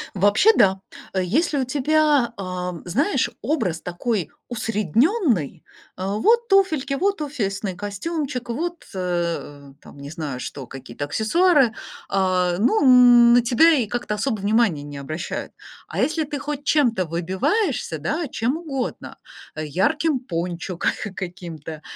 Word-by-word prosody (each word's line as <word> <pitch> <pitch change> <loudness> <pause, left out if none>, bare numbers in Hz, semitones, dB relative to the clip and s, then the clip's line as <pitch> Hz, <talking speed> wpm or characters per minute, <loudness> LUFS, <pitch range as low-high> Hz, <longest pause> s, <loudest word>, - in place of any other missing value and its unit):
Вообще, 205 - +5
да, 190 -1 +4 0.3
э, 190 - +1
если 290 - +1
у 260 - 0
тебя, 290 -1 +2
а, 180 -1 -4
знаешь, 280 - +1
образ 190 - -1
такой 180 - -2 0.2
усредненный: 225 - 0 0.3
э, 185 - -5
вот 445 - +2
туфельки, 320 - +2
вот 390 +4 0
офисный 200 -9 -3
костюмчик, 250 - -4
вот, 340 +8 -4
э, 170 -6 -3
там, - - -15
не 140 0 -8
знаю, 150 -5 -5
что, 135 0 -6
какие-то 135 +1 -7
аксессуары- 270 - +3 0.4
а, 185 -2 +1
ну, 290 - +3 0.5
на 245 - +6
тебя 245 +8 +5
и 250 -5 +1
как-то 240 -1 -3
особо 220 0 -1
внимания 205 -7 +2
не 145 -1 -8
обращают. 155 +5 -5 0.4
А - - -5
если 315 +1 +1
ты 290 -1 -5
хоть 290 0 -5
чем-то 245 -11 +2
выбиваешься, 190 - -1
да, 300 - -2
чем 245 +7 -1
угодно: 275 -7 -5 0.4
ярким 260 - 0
пончо 175 -3 -4
ка - - +1 0.3
каким-то, 170 -4 -7
220 Hz, 130 wpm, -22 LUFS, 175-295 Hz, 0.5 s, на